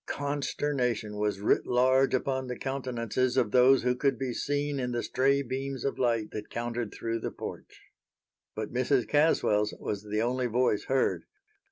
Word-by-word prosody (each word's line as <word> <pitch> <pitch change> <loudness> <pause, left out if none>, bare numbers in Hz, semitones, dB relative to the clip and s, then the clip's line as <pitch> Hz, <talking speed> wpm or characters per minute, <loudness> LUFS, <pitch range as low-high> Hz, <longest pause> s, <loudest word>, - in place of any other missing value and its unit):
Consternation 140 -6 -2
was 105 -2 -1
writ 105 - +2
large 130 +2 +3
upon 130 0 -1
the 125 - -4
countenances 130 -2 -2
of 120 -5 +2
those 130 +2 +5
who 125 0 +2
could 135 0 +1
be 130 -1 -3
seen 145 +2 -1
in 125 -1 -2
the 120 - -1
stray 140 +2 +2
beams 135 0 -4
of 140 - -2
light 115 -4 +1
that 105 -1 -6
countered 120 -2 -3
through 115 +2 -3
the - - -3
porch. - - -9 0.7
But 110 0 -5
Mrs. 130 0 +1
Caswell's 125 -9 +2
was 100 -1 -3
the 105 +1 -1
only 125 +1 0
voice 120 -3 +1
heard. 135 0 +1
125 Hz, 165 wpm, -29 LUFS, 115-135 Hz, 0.7 s, those